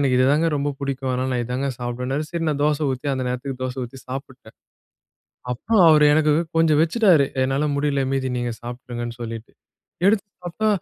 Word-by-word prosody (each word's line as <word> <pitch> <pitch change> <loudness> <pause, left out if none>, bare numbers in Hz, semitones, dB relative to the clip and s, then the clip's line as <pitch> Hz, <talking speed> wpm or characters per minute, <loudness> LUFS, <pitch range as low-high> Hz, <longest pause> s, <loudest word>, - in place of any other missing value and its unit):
எனக்கு 130 -3 +2
இதுதாங்க 145 +6 +3
ரொம்ப 145 +1 -1
புடிக்கும் 135 -1 -3
அதனால 130 +1 -1
நான் 120 -1 0
இதாங்க 125 +3 -2
சாப்பிடுவேன்னாரு, 125 +4 -3
சரி 170 -1 -2
நான் 145 -1 -1
தோசை 150 0 +1
ஊத்தி, 130 +3 -6
அந்த 130 - -2
நேரத்துக்கு 125 +1 -4
தோசை 130 +1 -4
ஊத்தி 130 +3 -10
சாப்பிட்டேன். 130 0 -8 1.0
அப்புறம் 195 - +2
அவரு 150 -1 +6
எனக்கு 155 -1 +3 0.2
கொஞ்சம் 155 -2 +4
வச்சுட்டாரு. 170 -4 +4 0.2
என்னால 135 +3 0
முடில. 140 -1 0
மீதி 135 -1 0
நீங்க 120 -1 -2
சாப்ட்ருங்கன்னு 120 -1 -6
சொல்லிட்டு. 115 -1 -7 0.5
எடுத்து 205 0 +3 0.2
சாப்ட்டா, 180 +5 -1
135 Hz, 165 wpm, -22 LUFS, 125-150 Hz, 1.0 s, அவரு